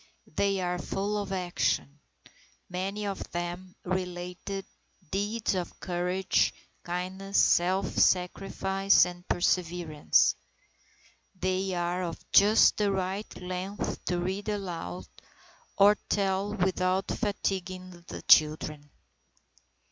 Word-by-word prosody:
They 200 -1 +1
are 180 0 -1
full 200 +3 -2
of 200 -1 -4
action. 175 -5 -1 0.7
Many 195 +3 -3
of 200 -1 -3
them 175 +1 -5
relate 180 +1 -4 0.5
deeds 205 +3 0
of 180 -2 -4
courage, 180 +1 0 0.3
kindness, 185 +3 -3
self 185 +3 +4
sacrifice, 195 +1 +3
and 175 0 -9
perseverance. 175 -3 +2 1.1
They 185 0 0
are 175 +1 -1
of 170 -2 -4
just 210 +2 +6
the 205 -1 +2
right 190 +2 -2
length 185 +2 -4
to 180 - 0
read 190 +4 -2
aloud 170 - -4 0.7
or 205 +1 +7
tell 200 +1 0
without 185 0 +1
fatiguing 185 -4 -3
the - - -7
children. 150 -1 +4
185 Hz, 100 wpm, -29 LUFS, 175-195 Hz, 1.1 s, or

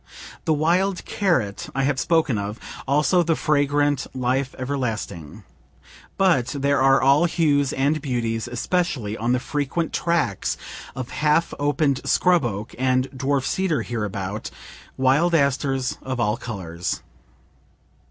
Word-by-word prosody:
The 160 - +3
wild 180 +5 +1
carrot 130 - 0
I 135 - +1
have 135 -1 +1
spoken 160 -6 +2
of; 105 +3 -5 0.3
also 150 +6 +3
the 165 -1 +1
fragrant 145 -2 +1
life 130 +1 -1
everlasting. 120 - -4 0.7
But 175 -11 +3
there 140 0 +2
are 135 0 +5
all 140 +5 +4
hues 145 -5 +2
and 145 +3 +1
beauties, 120 -4 -2
especially 120 - -1
on 115 +2 0
the 125 - +2
frequent 145 +5 -2
tracts 170 - 0 0.4
of 130 -3 -5
half 150 +2 +1
opened 145 -1 +1
scrub 180 -6 +3
oak 105 -1 -4
and 130 0 +1
dwarf 135 0 -1
cedar 185 -6 0
hereabout 105 -3 -4 0.5
wild 140 +7 +3
asters 135 -3 +1
of 130 -1 -4
all 105 -2 +2
colors. 90 -8 -5
135 Hz, 125 wpm, -23 LUFS, 120-155 Hz, 0.7 s, are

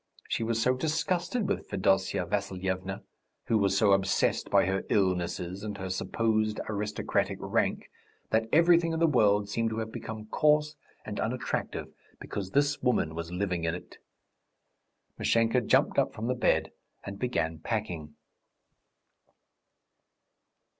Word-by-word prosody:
She - - -1
was 115 0 0
so 125 +3 +3
disgusted 170 - -1
with - - -2
Fedosya 95 0 +1
Vassilyevna, 95 0 -3 0.4
who 110 - +2
was 100 -1 +2
so 105 -2 +4
obsessed 95 0 +2
by - - +4
her 95 +1 -1
illnesses 90 -1 0
and 105 -2 -4
her 95 -1 -4
supposed 110 +2 0
aristocratic 105 0 -1
rank, - - -1 0.4
that 110 0 +1
everything 165 +1 +5
in 160 - -1
the 165 - +4
world 105 -9 +3
seemed 115 +2 0
to 110 - -4
have 110 0 -3
become 110 -1 -6
coarse 150 +5 +2 0.3
and - - -5
unattractive - - -3 0.3
because 95 -2 -5
this 145 +5 +1
woman 120 -11 +1
was 85 +1 -5
living 90 -2 -2
in 80 0 0
it. 90 - -11 1.2
Mashenka 115 +2 +3
jumped 110 - +3
up - - +1
from 110 - -4
the 125 - +1
bed 125 - +1 0.3
and 100 0 -7
began 80 -10 -1
packing. 85 -7 -4
105 Hz, 135 wpm, -29 LUFS, 95-125 Hz, 1.2 s, everything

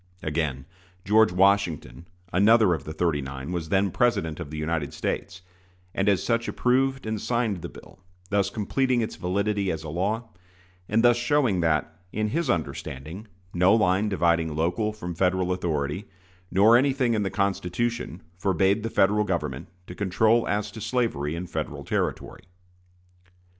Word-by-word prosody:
Again, 75 -4 -2 0.4
George 110 +2 +5
Washington, 90 -3 +1 0.3
another 105 0 +5
of 80 - -4
the 80 - -5
"thirty 80 -2 0
nine," 65 +3 -6
was 85 -3 -3
then 95 +1 +2
President 100 - 0
of 85 -5 -6
the 75 - -7
United 75 -1 -2
States, 95 -2 -4 0.5
and 95 +1 +1
as 100 -3 +2
such 115 0 0
approved 130 +1 +1
and 110 -1 -3
signed 115 -7 -1
the - - -6
bill, - - -15 0.3
thus 100 -1 +2
completing 120 +5 0
its 110 - -3
validity 100 +2 -1
as 80 0 -4
a 80 - -6
law, 105 +8 -2 0.6
and 115 +2 +2
thus 120 -1 +5
showing 120 -5 +2
that, 80 0 0
in 105 0 -1
his 160 +3 -1
understanding, 85 - -4 0.3
no 90 +4 +4
line 105 -1 +2
dividing 85 -4 +1
local 90 +7 0
from 90 -5 -6
Federal 90 +1 +1
authority, 80 0 -2 0.4
nor 105 +5 +5
anything 130 -1 +2
in 110 - +1
the 100 - -1
Constitution, 100 0 -2 0.2
forbade 95 +2 +2
the 115 - -3
Federal 105 0 +3
Government 75 -9 -3 0.2
to 90 - -9
control 110 +5 +2
as 105 +1 -1
to 110 - -9
slavery 80 - -1
in 85 +2 -4
Federal - - -5
territory. - - -3
95 Hz, 155 wpm, -25 LUFS, 85-110 Hz, 0.6 s, George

